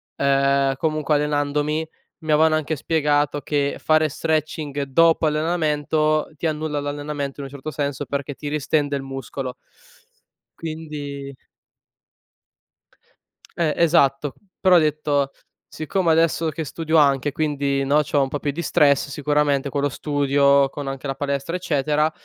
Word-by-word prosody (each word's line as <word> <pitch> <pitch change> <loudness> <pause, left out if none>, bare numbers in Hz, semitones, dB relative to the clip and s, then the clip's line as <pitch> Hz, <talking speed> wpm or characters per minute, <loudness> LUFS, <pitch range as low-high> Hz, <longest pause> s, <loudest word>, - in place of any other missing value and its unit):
ehm, 140 0 +2
comunque 155 0 0
allenandomi, 150 +1 0 0.3
mi 155 -1 -3
avevano 155 +1 +4
anche 155 0 -2
spiegato 145 -1 +1
che 140 -1 -1
fare 155 0 +3
stretching 155 -2 -2
dopo 165 +4 +3
allenamento 155 -1 0
ti 165 - -1
annulla 155 -1 -2
l'allenamento, 145 -1 -4
in 140 - -5
un 135 - -14
certo 140 +2 -7
senso, 145 -2 -3
perché 140 +1 -4
ti 145 - -7
ristende 145 -1 0
il 135 - -4
muscolo. 135 -1 -6 1.0
Quindi 145 -4 -6 2.2
Eh, 160 -3 +1
esatto. 145 -4 +3 0.3
Però 185 -1 +5
ho 175 - +8
detto: 150 -2 0 0.4
"Siccome, 170 +2 -1
adesso 165 0 +2
che 155 +1 -4
studio 160 +2 -1
anche, 140 -1 +3
e - - -7
quindi, 140 -2 -1
no, 145 +2 +3
c'ho 145 -1 +1
un 135 - +1
pò 145 +2 -4
più 145 +1 -1
di 165 - -4
stress, 145 -3 +3
sicuramente 145 -1 0
con 140 +1 -2
lo 145 - +2
studio, 140 0 +2
con 140 0 -7
anche 135 +1 -5
la 135 - -2
palestra, 140 +3 -2
eccetera;" 150 -2 +1
145 Hz, 145 wpm, -22 LUFS, 140-155 Hz, 2.2 s, ho